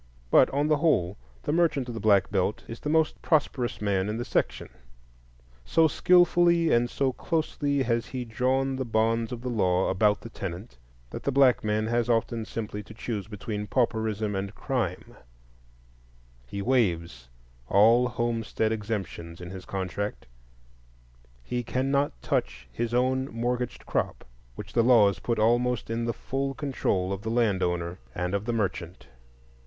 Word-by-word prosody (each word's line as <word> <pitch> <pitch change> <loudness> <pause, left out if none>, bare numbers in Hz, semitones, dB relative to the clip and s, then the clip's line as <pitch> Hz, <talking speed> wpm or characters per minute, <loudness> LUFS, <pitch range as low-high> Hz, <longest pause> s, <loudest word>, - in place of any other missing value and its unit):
But - - +6
on 145 +2 0
the 155 -1 +3
whole 105 - +2 0.3
the - - -1
merchant 155 -5 +2
of 120 - -5
the 115 - -5
Black 100 -2 +3
Belt 100 +1 0
is 115 - -7
the 150 - -4
most 160 0 +1
prosperous 140 -6 0
man 100 -1 0
in 110 - -2
the 120 - -3
section. - - -1 0.9
So 160 - +4
skilfully 175 0 +4
and 120 +1 +3
so 135 0 0
closely 145 -4 -1
has 115 -1 0
he 125 -2 -5
drawn 130 +3 0
the 130 - -1
bonds 115 0 0
of 120 -2 -5
the 125 - -3
law 95 -5 +1
about 105 +2 +2
the 115 - -9
tenant, 95 - -7 0.3
that - - -6
the 140 - -1
black 135 -2 +4
man 105 0 0
has 120 +1 0
often 115 -1 0
simply 105 -2 -5
to 110 +2 -13
choose 110 -4 -4
between 105 0 -5
pauperism 110 -4 0
and 95 +2 -4
crime; 120 -10 -3 1.3
he 100 +9 -5
"waives" 85 - 0 0.4
all 115 - +5
homestead 115 -2 -1
exemptions 100 -6 -4
in 90 0 -8
his 95 -1 -8
contract; 95 +2 -4 1.2
he 125 - -2
cannot 135 - 0
touch 65 +1 -2
his 115 - -3
own 130 +2 +1
mortgaged 120 +1 -3
crop, - - -2 0.3
which - - -9
the 120 - +4
laws 110 -5 +5
put 115 - -1
almost 120 +1 +1
in 115 +1 -1
the 115 - 0
full 135 +3 -3
control 100 -10 -1
of 95 - -5
the 110 - -4
land 110 -5 +1
owner 90 0 -2 0.2
and 90 +1 -2
of 100 +1 -1
the 120 - -1
merchant. 95 -5 -3
115 Hz, 160 wpm, -27 LUFS, 100-130 Hz, 1.3 s, But